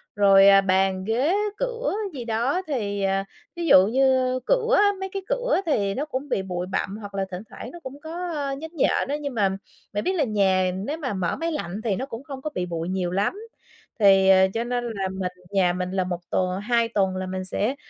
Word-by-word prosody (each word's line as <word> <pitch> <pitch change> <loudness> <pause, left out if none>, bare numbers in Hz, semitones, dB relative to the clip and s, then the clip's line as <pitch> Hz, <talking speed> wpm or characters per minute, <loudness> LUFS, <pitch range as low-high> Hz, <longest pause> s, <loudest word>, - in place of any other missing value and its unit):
rồi, 195 -1 +6
à, 195 0 +8
bàn, 190 0 +1
ghế, 245 - +1 0.2
cửa - - -2 0.2
gì 245 -4 -6
đó 240 +10 0
thì, 205 -8 -2
à, 195 0 +1 0.3
ví 345 -1 -3
dụ 190 -7 +7
như 255 +1 +2
cửa - - +2
á, 410 - +5
mấy 385 - -4
cái 390 - -3
cửa - - +1
thì 205 -11 +1
nó 280 +8 -2
cũng 285 -1 -5
bị 200 - 0
bụi 180 -1 -4
bặm, 195 +1 -2
hoặc 205 -2 -9
là 195 -1 0
thỉnh 180 - -5
thoảng 240 - -9
nó 345 - -10
cũng 270 +2 -8
có, 340 +3 -5
ơ, 280 -2 -2
nhến 315 +3 -8
nhện 295 - +1
á. 285 - -1
Nhưng 285 -2 -4
mà 205 -4 +2 0.4
bạn 205 - -1
biết 375 - 0
là 320 - +2
nhà 190 -5 +2
nếu 215 +12 -3
mà 270 -9 -3
mở 185 -3 -1
máy 330 +1 -2
lạnh 210 - -4
thì 215 -5 0
nó 260 - -3
cũng 250 -2 -8
không 275 -3 -8
có 305 - -3
bị 180 - -1
bụi 170 -1 -4
nhiều 185 -2 -1
lắm, 195 +3 +1 0.7
thì, 195 -2 +6
ờ, 190 0 +6
cho 230 +1 -1
nên 245 0 -2
là 210 -5 -3
mình 185 -1 -3 0.2
nhà 185 -3 +3
mình 180 0 -3
là 190 -1 0
1 180 -1 -3
t - - -3 0.3
hai 235 0 +2
tuần 195 -4 +1
là 185 0 -3
mình 185 0 -4
sẽ 215 +7 -1
215 Hz, 235 wpm, -24 LUFS, 190-280 Hz, 0.7 s, à